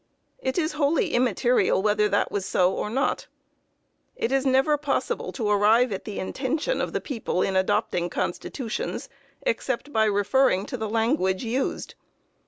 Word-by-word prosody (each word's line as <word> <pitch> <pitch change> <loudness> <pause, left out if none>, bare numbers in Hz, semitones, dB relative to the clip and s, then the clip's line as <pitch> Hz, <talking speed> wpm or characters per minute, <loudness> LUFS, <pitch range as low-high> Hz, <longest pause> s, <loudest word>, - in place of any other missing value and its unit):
It 260 0 -2
is 325 -1 +1
wholly 300 +1 +1
immaterial 240 -3 +2
whether 210 0 +2
that 205 - +1
was 200 - -2
so 180 +1 +2
or 210 - -3
not. 265 +6 -1 0.9
It 230 - -2
is 270 0 +1
never 265 +3 +3
possible 290 -1 -2
to 225 -5 -2
arrive 210 +4 +4
at 195 - -4
the 210 - -6
intention 280 - -2
of - - -2
the - - -1
people 225 - -2
in 190 - -1
adopting 180 -2 +1
constitutions, 225 +8 -4 0.3
except 290 - -2
by 220 -1 +3
referring 205 0 +2
to 255 - -5
the 220 -2 -3
language 225 -4 +1
used. 250 +4 -2
230 Hz, 155 wpm, -25 LUFS, 205-270 Hz, 0.9 s, arrive